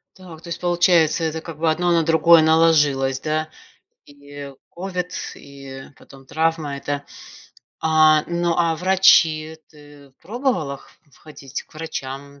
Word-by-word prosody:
Так, 175 -4 -13
то 175 - -14
есть 170 - -6
получается, 175 -2 +2
это 160 0 -3
как 165 -2 -9
бы 160 +1 +1
одно 175 +2 0
на 170 -1 +3
другое 165 +1 +5
наложилось, 150 -5 +3
да, 155 +1 -2 0.6
и 145 -1 -11 0.2
ковид, 180 0 -5 0.2
и 135 -1 -11
потом 135 -1 -17
травма 160 -2 -1
эта. 145 0 -5 0.7
А, 155 -1 +4
ну, 170 0 -1
а 165 -2 +1
врачи? 160 -3 +3
Ты 145 -2 -18
пробовала 200 - -2
х - - -20 0.3
ходить 140 -3 -9
к - - -26
врачам, 140 -3 -7
155 Hz, 135 wpm, -21 LUFS, 145-170 Hz, 0.7 s, другое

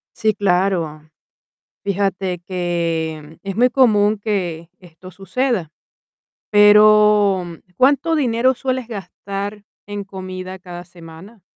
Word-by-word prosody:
Sí, 220 -2 +1
claro. 180 -5 0 0.7
Fíjate 195 -2 -1
que 165 -3 -3
es 195 0 -5
muy 250 +2 +4
común 215 -5 +3
que 175 -6 -3
esto 180 +1 -14
suceda. 195 - -2 0.8
Pero, 210 -2 +5 0.3
¿cuánto 285 - +3
dinero 255 -2 +2
sueles 255 -1 -3
gastar 200 -1 -6 0.2
en 205 -1 -6
comida 185 -1 -8
cada 175 -1 -9
semana? 175 +5 -14
195 Hz, 100 wpm, -19 LUFS, 175-215 Hz, 0.8 s, Pero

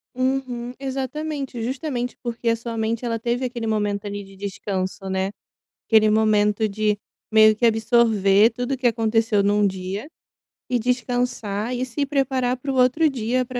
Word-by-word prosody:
Uhum. 255 -2 -2
Exatamente, 270 -1 -4
justamente 250 0 -3
porque 235 -1 -2
a 230 - +3
sua 230 0 -6
mente 225 +2 -1
ela 230 -1 -1
teve 240 +3 -1
aquele 235 -2 -4
momento 205 -1 -1
ali 205 0 -5
de 195 0 -15
descanso, 190 -1 -4
né. 190 +1 -1 0.6
Aquele 215 -1 +5
momento 215 0 +3
de 210 0 0 0.3
meio 215 0 +6
que 235 +2 +2
absorver 220 -2 +4
tudo 245 +3 -3
que 255 -1 -1
aconteceu 225 -2 +2
num 205 0 +3
dia, 190 +6 -4 0.6
e 250 -1 +1
descansar, 245 -2 -1
e 250 - -1
se 280 +4 -2
preparar 265 -3 0
para 275 +2 -4
o - - -3
outro 255 +6 +4
dia, 255 -1 -1
230 Hz, 155 wpm, -23 LUFS, 210-250 Hz, 0.6 s, meio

